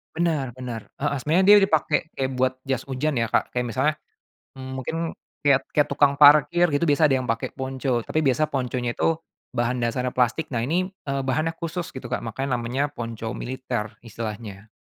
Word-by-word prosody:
Benar 155 -8 0
benar, 120 -4 -6
heeh, 145 -1 0
sebenarnya 165 +8 +2
dia 210 - +10
dipakai 155 -1 +2 0.2
kayak 135 0 -1
buat 130 0 +2
jas 130 -1 -2
hujan 135 0 -1
ya, 115 - +1
Kak, - - 0
kayak 125 0 0
misalnya, 130 +6 +1 0.6
mmm, 130 0 -8
mungkin 130 +5 -4 0.5
kayak 140 -2 +4
kayak 150 - +3
tukang 140 0 +3
parkir 150 +4 +7
gitu 145 +2 0
biasa 150 +1 +4
ada 135 - +2
yang 130 - -2
pakai 115 -1 -2
ponco 130 -3 -2
tapi 155 - -1
biasa 150 +1 +1
ponconya 125 -2 -1
itu 165 +6 +1 0.4
bahan 120 +1 0
dasarnya 125 +2 -1
plastik 125 +5 0
nah 115 - 0
ini, 180 +9 0 0.2
eee, 135 0 0
bahannya 155 +5 0
khusus 170 +1 -4
gitu, 130 - -7
Kak, - - -1
makanya 130 +3 -2
namanya 125 +4 -1
ponco 115 -2 -5
militer 120 -5 -4
istilahnya. 110 -2 -7
130 Hz, 180 wpm, -24 LUFS, 120-150 Hz, 0.6 s, dia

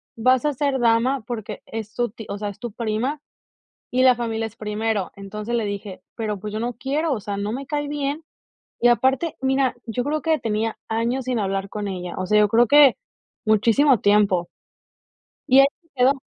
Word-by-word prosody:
"Vas 255 +4 +3
a 295 - +2
ser 275 0 0
dama 240 +2 +2
porque 225 -4 -5
es 220 -1 -6
tu 240 -2 -1
tí 225 +1 -10
o 200 - -3
sea, 205 0 -3
es 200 - -10
tu 240 -2 -5
prima, 235 +6 -2 0.7
y 255 - +4
la 255 -1 +6
familia 225 -2 -2
es 225 - -15
primero". 215 -2 -2
Entonces, 210 +4 -5
le 230 -3 0
dije: 200 -2 -6
"Pero, 215 -3 -3
pues, 210 +2 -6
yo 215 - -2
no 240 +1 -2
quiero, 285 +6 -1
o 235 - -3
sea, 200 0 -5
no 205 +1 -2
me 270 +4 -4
cae 290 0 -2
bien". 290 +1 -3 0.6
Y 240 - +6
aparte, 265 +6 +2
mira, 265 -1 +1
yo 240 +2 -2
creo 300 +2 -1
que 320 -1 +2
tenía 220 -1 -2
años 235 +3 -1
sin 250 -2 0
hablar 195 -1 -2
con 210 0 -5
ella, 180 -2 -5
o 185 - -2
sea, 210 +3 +3
yo 210 - +4
creo 235 +3 +4
que 285 0 +7 0.5
muchísimo 230 +4 +4
tiempo. 205 -4 +3 1.0
Y 265 +1 +7
ahí 275 - +7 0.2
se 330 - -33
quedó. 270 +2 +3
230 Hz, 200 wpm, -23 LUFS, 210-265 Hz, 1.0 s, que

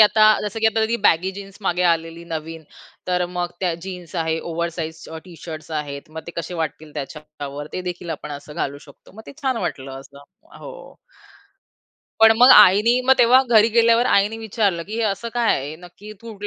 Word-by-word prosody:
आता 215 0 +6 0.2
जसं 210 +1 -5
की 225 - +3
आता 220 0 +2 0.2
बॅगी 185 -1 +3
जीन्स 195 -1 -11
मागे 180 -2 0
आलेली 165 +1 -5
नवीन 160 0 -6 0.4
तर 180 0 0
मग 175 0 -4
त्या 180 -3 0
जीन्स 180 -3 -9
आहे, 160 -1 -1
ओव्हर 170 0 -3
साइज 160 -1 -6 0.2
टी 180 -2 -13
शर्ट्स 155 -2 -8
आहेत, 145 +1 -9
मग 160 0 -8
ते - - -6
कसे 170 +2 -8
वाटतील 155 0 -6
त्याच्यावर 145 0 -8
ते 185 - -4
देखील 175 -1 -8
आपण 150 - -9
असं 150 +1 -13
घालू 140 +1 -3
शकतो. 140 - -18
मग 220 - -11
ते - - -10
छान 260 -3 0
वाटलं 135 0 -7
असं. 140 +1 -16 0.4
हो. - - -12 1.2
पण 225 0 +8
मग 250 +2 +8
आईनी 210 +5 +6
मग 260 - +6
तेव्हा 245 +2 +6
घरी 225 -1 +5
गेल्यावर 230 +1 +3
आईनी 205 +1 +2
विचारलं, 205 -5 -1
की 210 +6 -7
"हे 230 - -1
असं 215 +3 -2
काय 240 -2 +2
आहे? 140 +3 -6
नक्की 180 +5 -13
तू 230 -1 -9
180 Hz, 190 wpm, -21 LUFS, 160-220 Hz, 1.2 s, पण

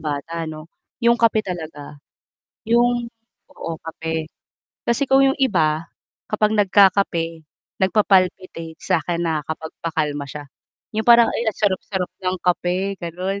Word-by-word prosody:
bata 150 +2 -4
'no, 155 +1 -9 0.4
'yong 235 0 +5
kape 220 -2 +3
talaga 160 -5 -7 0.7
'yong 240 0 +3 0.4
oo, 165 - -5 0.2
kape. 160 -1 -4 0.6
Kasi 235 +4 +2
kung 270 0 +5
'yong 270 - +2
iba 165 -9 +1 0.4
kapag 215 0 +2
nagkakape 185 -5 +3 0.4
nagpa-palpitate, 185 -4 +1
sa 165 - +1
akin 170 +1 -2
nakakapagpakalma 155 -1 -3
siya, 145 +1 -7 0.5
'yong 220 +2 -1
parang, 235 -1 +8
ay 230 -1 -1
ang 215 - -3
sarap-sarap 190 -2 -1
ng 185 0 0
kape, 180 +2 0
gano'n. 180 +3 -3
180 Hz, 120 wpm, -21 LUFS, 160-210 Hz, 0.7 s, parang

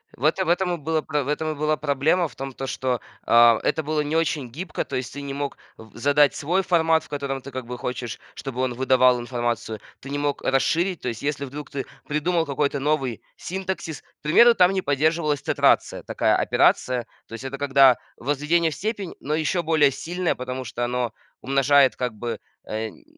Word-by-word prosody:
в 125 - -12
это 180 +5 +2
в - - -2
этом 180 0 +2
и - - -7
была 160 +1 -1
про 150 -2 -1
в - - -8
этом 155 +2 -1
и - - -5
была 155 +1 +1
проблема. 150 +5 +1
В - - -18
том, 135 0 -6
то 135 - -5
что, 130 -2 -2 0.2
а, 115 -1 +6
это 160 - 0
было 155 +1 -1
не 150 +2 -2
очень 150 -6 0
гибко. 170 +9 -4
То - - -5
есть 130 0 -3
ты 145 - -6
не 140 -1 -5
мог 140 0 -4 0.2
в 110 -1 -15
задать 145 +3 +4
свой 175 +6 0
формат, 165 -3 +3
в - - -17
котором 140 -2 -3
ты 140 +2 -10
как 130 -2 -5
бы 125 - -5
хочешь, 120 -1 -4 0.2
чтобы 130 -2 -5
он 130 -1 0
выдавал 130 -1 +4
информацию, 120 -3 -3 0.2
ты 135 - -10
не 145 - -2
мог 145 0 -1
расширить. 170 +6 +1
То 125 - -2
есть 115 - -6
если, 145 0 -2
вдруг, 145 +2 -8
ты 135 -2 -4 0.2
придумал 165 +3 0
какой-то 140 0 -1
новый 135 -5 -1
синтаксис 190 -4 -5
к - - -35
примеру, 235 +10 +6
там 180 +1 +5
не 190 -1 0
поддерживалась 150 0 +1
тетрация- - - +2
такая - - +1
операция. 125 -2 +2 0.2
То - - -13
есть 115 - -7
это 135 +1 -5
когда 135 -2 +5 0.2
возведение 150 +5 +1
в - - -6
степень, 205 - -4
но 150 +2 -2
еще 160 +3 0
более 155 -4 +3
сильное, 175 +5 -2
потому 130 +1 -5
что 120 +1 -4
оно 120 -2 -2 0.3
умножает 135 0 +4
как 125 -2 -2
бы, 115 +1 -5 0.3
э, 110 +1 -3
м, - - -14
140 Hz, 210 wpm, -24 LUFS, 130-160 Hz, 0.3 s, а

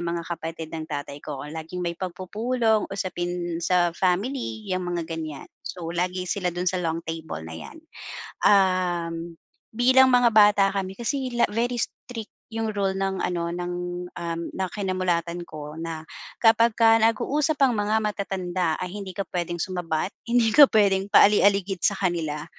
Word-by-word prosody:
mga 170 0 -2
kapatid 165 -1 -6
ng 160 -1 -5
tatay 145 -1 -5
ko, 145 -3 -6
laging 165 +3 -5
may 170 - -1
pagpupulong, 215 +6 -1
usapin 175 -3 -3
sa 175 0 +2
family, 215 +6 -1
'yang 185 -2 -2
mga 175 -1 -2
ganyan. 160 -3 -6 0.2
So, 170 -2 -6
lagi 180 +1 -1
sila 185 0 -1
dun 175 +1 -3
sa 185 0 0
long 165 -1 -2
table 160 - -6
na 80 - -8
'yan. 80 - -9 0.7
Um, 175 -4 +2 0.3
bilang 260 +3 +5
mga 245 -1 +5
bata 205 -2 +6
kami 190 -1 -3
kasi 260 +2 -2
la - - +5
very 240 +2 0
strict 230 -1 -6 0.2
yung 225 0 -2
role 195 -1 +1
ng 195 0 -2
ano, 170 -1 -1
ng, 175 +1 -4 0.4
um, 170 -1 -4
na 190 -1 -2
kinamulatan 180 -3 -1
ko, 150 -1 -8
na 165 -1 -5 0.3
kapagka 225 0 +5
nag-uusap 285 +8 +1
ang 260 - +3
mga 210 0 +1
matatanda 185 -5 -1
ay 180 -1 -5
hindi 195 -3 -7
ka 200 - -1
puwedeng 175 -2 -3
sumabat, 175 0 -2 0.2
hindi 235 -2 +3
ka 290 0 +9
puwedeng 200 -3 +3
paali-aligid 200 -2 +4
sa 205 -5 +2
kanila, 165 -6 -1
185 Hz, 155 wpm, -25 LUFS, 170-210 Hz, 0.7 s, ka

